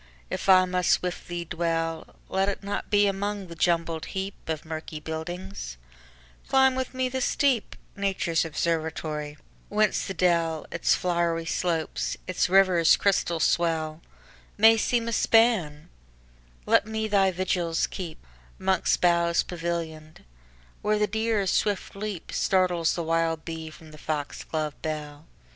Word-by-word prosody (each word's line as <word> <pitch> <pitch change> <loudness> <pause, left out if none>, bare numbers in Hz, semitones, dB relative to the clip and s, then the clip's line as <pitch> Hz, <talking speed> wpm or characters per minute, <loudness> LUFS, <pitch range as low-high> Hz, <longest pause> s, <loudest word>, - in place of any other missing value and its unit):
if - - -3
I 185 -1 +7
must 180 -1 +1
with 180 -1 -4
thee 175 -1 -4
dwell, 165 -1 -2
Let 190 +1 +1
it 200 - -4
not 200 +1 -4
be 205 0 +4
among 200 0 -2
the 170 - -8
jumbled 165 -1 0
heapOf 190 -5 -4
murky 160 -1 -6
buildings; 160 - -6 0.7
climb 265 0 +5
with 260 0 -3
me 255 0 +1
the 260 +1 -3
steep,—Nature's 200 - 0
observatory—whence 160 +4 -2
the 195 - -4
dell, 165 -3 +1
Its 170 - +2
flowery 170 -2 0
slopes, 165 -1 -1
its 185 -1 0
river's 185 -3 +5
crystal 175 -4 +1
swell, 160 -1 +1 0.6
May 225 +2 +7
seem 230 +1 0
a 230 - -2
span; 215 -12 +3 0.8
let - - +3
me 220 0 -2
thy 200 -2 +3
vigils 175 -2 0
keep'Mongst 190 +1 -3
boughs 170 -1 +3
pavillion'd, 165 -3 -5 0.6
where 210 0 +1
the 210 - +2
deer's 220 -2 0
swift 205 -3 0
leapStartles 185 -3 0
the 170 - -2
wild 165 0 0
bee 160 -1 -5
from 155 0 -14
the 155 - -13
fox 150 -2 -4
glove 155 -2 -3
bell. 150 -1 -5
175 Hz, 130 wpm, -26 LUFS, 160-200 Hz, 0.8 s, I